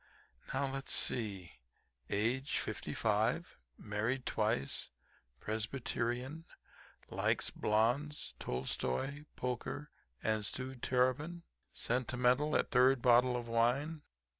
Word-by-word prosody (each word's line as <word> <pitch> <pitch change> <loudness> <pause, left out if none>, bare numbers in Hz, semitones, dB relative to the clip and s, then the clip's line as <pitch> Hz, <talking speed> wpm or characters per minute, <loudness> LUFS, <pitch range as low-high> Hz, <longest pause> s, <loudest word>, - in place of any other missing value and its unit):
Now, 135 +1 +1
let's 135 0 -2
see. 100 - 0 0.5
"Age 120 +7 +1
55; - - -1 0.2
married 110 +5 -2
twice; 105 -11 0 0.5
Presbyterian, 120 +6 -2 0.7
likes - - +1
blondes, 125 +8 +1
Tolstoi, 65 - -2
poker 125 +4 -3 0.3
and 110 -1 +1
stewed 130 +3 -4
terrapin; 130 +7 +1 0.3
sentimental 125 +4 +2
at - - +1
third 130 -1 +5
bottle 125 0 +5
of 120 -1 -5
wine." 125 +7 +1
125 Hz, 90 wpm, -35 LUFS, 110-135 Hz, 0.7 s, third